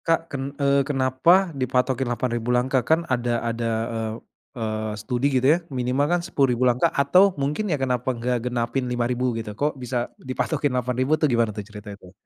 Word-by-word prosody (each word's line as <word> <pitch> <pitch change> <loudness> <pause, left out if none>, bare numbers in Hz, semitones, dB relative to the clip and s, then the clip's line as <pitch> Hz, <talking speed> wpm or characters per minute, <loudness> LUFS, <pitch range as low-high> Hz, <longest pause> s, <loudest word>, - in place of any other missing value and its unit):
Kak 165 -1 +4
ken 135 -1 -2 0.2
eee, 140 0 +3
kenapa 145 +7 +3
dipatokin 130 -1 0
8.000 120 0 -2
langkah? 130 +1 +1
Kan 160 +5 +1
ada, 120 -4 0
ada 115 0 -2 0.3
eee 110 -1 -3 0.4
eee, 110 -1 -3
studi 125 +3 -2
gitu 130 -2 +1
ya - - +2
minimal 130 +1 0
kan 175 - +1
10.000 135 -8 +1
langkah 125 +8 +2
atau 140 +7 +4 0.2
mungkin 150 +10 -1
ya 150 - +1
kenapa 130 -2 -1
nggak 125 +1 0
genapin 120 +1 -1
5.000 125 +1 -1
gitu. 110 -2 -5
Kok 145 +6 -1
bisa 125 -1 -3
dipatokin 140 +2 -2
8.000 125 +2 -1
tuh 155 - +4
gimana 115 -2 +1
tuh 105 - -5
cerita 105 0 -10
itu? 95 -3 -14
125 Hz, 175 wpm, -24 LUFS, 120-140 Hz, 0.4 s, Kak